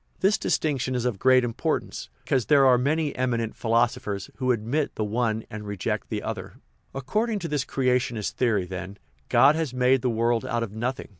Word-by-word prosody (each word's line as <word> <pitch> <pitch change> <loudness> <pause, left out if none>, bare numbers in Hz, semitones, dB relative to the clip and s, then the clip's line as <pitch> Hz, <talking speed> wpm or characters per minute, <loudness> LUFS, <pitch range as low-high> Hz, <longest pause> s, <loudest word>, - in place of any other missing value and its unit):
This 195 +3 +2
dis - - +1
tinction 135 -4 -1
is 125 -1 -1
of 115 -6 -1
great 130 +1 +5
importance, 115 -2 -3
because 125 -6 0
there 140 -2 +5
are 125 -2 +5
many 150 +3 0
eminent 120 -3 -1
philosophers 115 -4 0
who 130 -1 +1
admit 125 +6 -1
the 110 - -1
one 110 0 -1
and 110 0 -7
reject 100 -3 -3
the - - -3
other. - - -5 0.4
According 215 - -1
to 175 -4 -4
this 145 -3 -1
creationist 125 -5 0
theory, 110 -7 +1
then, 95 +2 -7 0.3
God 140 +2 +6
has 155 -6 -2
"made 125 +1 +3
the 125 - 0
world 115 0 +1
out 120 0 -1
of 110 - -5
nothing." 120 +5 -4
125 Hz, 190 wpm, -25 LUFS, 110-135 Hz, 0.4 s, God